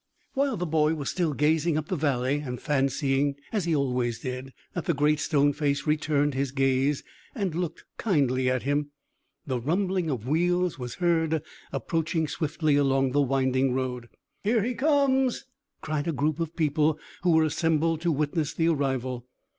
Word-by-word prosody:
While 275 -4 +1
the 180 - -2
boy 155 -1 +2
was 145 -3 -3
still 170 -4 0
gazing 155 +2 +2
up 155 0 -3
the 185 - 0
valley, 140 -2 0
and 125 -4 -5
fancying, 140 -1 +1 0.2
as 205 -6 0
he 165 -2 +1
always 125 -4 0
did, 130 0 -5 0.2
that 175 -4 -4
the 170 - +1
Great 150 +1 +2
Stone 145 -1 +2
Face 140 -1 -1
returned 150 -1 +1
his 135 0 -1
gaze 135 +1 +1 0.3
and 195 -8 -1
looked 170 -1 -4
kindly 130 - +1
at 130 -1 0
him, 145 +2 0 0.6
the 130 -3 -1
rumbling 180 - 0
of 125 -4 -3
wheels 175 +2 +1
was 125 -1 -5
heard, 160 -3 +1 0.3
approaching 160 +3 -1
swiftly 155 -1 0
along 135 -2 +2
the 145 +2 +3
winding 130 -1 +1
road. 125 -2 -3 0.3
"Here 220 +1 +2
he 250 +3 -1
comes!" 270 -2 +2 0.4
cried 150 0 -2
a - - +1
group 150 +2 0
of 165 -1 -3
people 155 -1 +2 0.2
who 175 -2 +3
were 160 0 +5
assembled 160 +1 +1
to 170 0 +1
witness 150 +1 -1
the 165 +1 +2
arrival. 130 -5 -1
150 Hz, 170 wpm, -27 LUFS, 135-165 Hz, 0.6 s, were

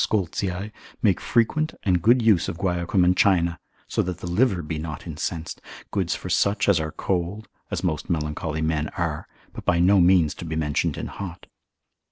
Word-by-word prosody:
Scoltzii, 95 0 -1 0.3
make 100 -5 +3
frequent 155 +7 +1
and 90 -4 +2
good 120 +5 +4
use 105 -7 +4
of - - -5
guaiacum 90 0 +1
and 90 +1 +4
China, 85 -4 +3 0.3
so - - 0
that 90 -1 -3
the 90 - -8
liver 90 0 +2
be 75 0 -4
not 80 -2 -6
incensed, 80 0 -4 0.3
good - - -1
for - - -3
such 100 +1 +2
as 100 -5 +4
are 80 0 -3
cold, 95 +3 -2 0.2
as - - -3
most 80 -1 -2
melancholy 80 -1 -2
men 80 -1 0
are, - - -2 0.3
but - - -8
by 85 - +2
no 95 +3 +5
means 85 -3 +4
to - - -9
be 80 -1 -4
mentioned 75 -2 0
in - - -4
hot. 90 -4 -7
90 Hz, 185 wpm, -24 LUFS, 80-100 Hz, 0.3 s, no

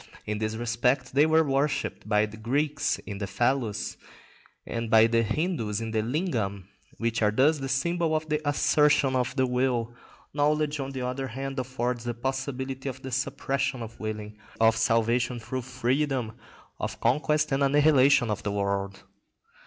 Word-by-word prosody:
In 105 0 -3
this 110 0 -2
respect 125 +3 0
they 145 +3 +5
were 160 0 +4
worshipped 140 -5 -1
by 105 0 +3
the 105 0 -10
Greeks 140 +7 0
in 100 -2 -6
the 100 - -3
phallus, 120 +2 -1 0.7
and 115 -1 -4
by 110 0 +7
the 115 0 +3
Hindus 115 - -1
in 115 -1 -4
the 110 -1 +1
lingam, 110 - -2 0.3
which 115 0 -1
are 105 - +4
thus 140 +8 +3
the 135 -1 -4
symbol 165 +4 +1
of 155 0 -2
the 150 0 0
assertion 145 -2 +3
of 125 +1 0
the 130 -2 +2
will. 125 -2 0 0.4
Knowledge, 150 0 +1
on 135 0 -3
the 130 -2 -4
other 130 +2 -3
hand, 135 +2 -5
affords 125 -1 -2
the 120 -1 -3
possibility 135 +1 -3
of 130 0 -9
the 130 - -6
suppression 135 +1 -1
of 115 0 -10
willing, 105 -1 -5 0.2
of 110 0 +5
salvation 115 +2 +1
through 130 +3 -4
freedom, 130 0 -1 0.5
of - - -4
conquest 150 +6 +1
and 135 +1 +1
annihilation 140 -4 +4
of 105 - -2
the 105 - -2
world. 100 -1 -2
125 Hz, 165 wpm, -27 LUFS, 115-140 Hz, 0.7 s, by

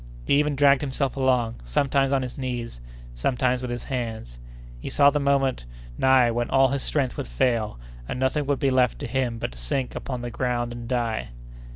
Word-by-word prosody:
He 140 - +4
even 150 -1 +1
dragged 140 -1 +5
himself 135 -1 -1
along, 125 -4 +1
sometimes 135 - +1
on 135 -1 +2
his 125 - -6
knees, 120 - -5 0.3
sometimes 125 - 0
with 125 - -4
his 120 0 -4
hands. 110 - -5 0.4
He - - -6
saw 140 0 +5
the 150 - 0
moment 135 - +1 0.3
nigh 130 - +4
when 120 +1 -1
all 135 0 +4
his 140 +1 -1
strength 135 -4 -1
would - - -4
fail, 105 - 0 0.3
and - - -3
nothing 135 +2 0
would 140 -1 +1
be 135 -1 +1
left 125 -2 +2
to - - -6
him 125 -3 -1
but 115 - -4
to - - -12
sink 125 - -2
upon 125 -2 -5
the 120 - -4
ground 120 0 -1
and 120 -1 -8
die. 120 -3 -1
130 Hz, 200 wpm, -25 LUFS, 120-135 Hz, 0.4 s, dragged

